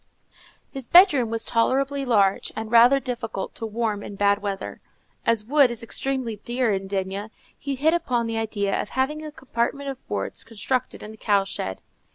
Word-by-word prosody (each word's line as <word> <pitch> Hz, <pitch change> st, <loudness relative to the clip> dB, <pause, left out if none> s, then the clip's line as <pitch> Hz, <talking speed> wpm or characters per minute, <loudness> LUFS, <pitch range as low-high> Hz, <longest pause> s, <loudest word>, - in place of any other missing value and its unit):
His 270 Hz, -4 st, -6 dB
bedroom 300 Hz, -, +6 dB
was 225 Hz, 0 st, +1 dB
tolerably 270 Hz, +4 st, +1 dB
large, 200 Hz, -6 st, +2 dB
and 220 Hz, 0 st, -5 dB
rather 240 Hz, +4 st, +7 dB
difficult 235 Hz, -6 st, -4 dB
to 225 Hz, -, -5 dB
warm 215 Hz, -2 st, -2 dB
in 205 Hz, -, -8 dB
bad 200 Hz, +1 st, +2 dB
weather. 200 Hz, -1 st, -5 dB, 0.5 s
As 230 Hz, -2 st, +3 dB
wood 280 Hz, +1 st, +5 dB
is 235 Hz, -1 st, -5 dB
extremely 255 Hz, -2 st, -2 dB
dear 240 Hz, +1 st, 0 dB
at 195 Hz, 0 st, -3 dB
D——, 195 Hz, +1 st, -3 dB, 0.3 s
he 280 Hz, -1 st, -4 dB
hit 305 Hz, +5 st, +2 dB
upon 250 Hz, -9 st, 0 dB
the 225 Hz, 0 st, -2 dB
idea 205 Hz, -3 st, -1 dB
of -, -, -7 dB
having 295 Hz, +4 st, -1 dB
a 305 Hz, -, -6 dB
compartment 270 Hz, 0 st, -3 dB
of 265 Hz, -, -13 dB
boards -, -, -4 dB
constructed 250 Hz, +3 st, -3 dB
in 210 Hz, -, -8 dB
the 220 Hz, -, -13 dB
cow 200 Hz, -2 st, +2 dB
shed. 95 Hz, -, -5 dB
230 Hz, 180 wpm, -24 LUFS, 205-265 Hz, 0.5 s, rather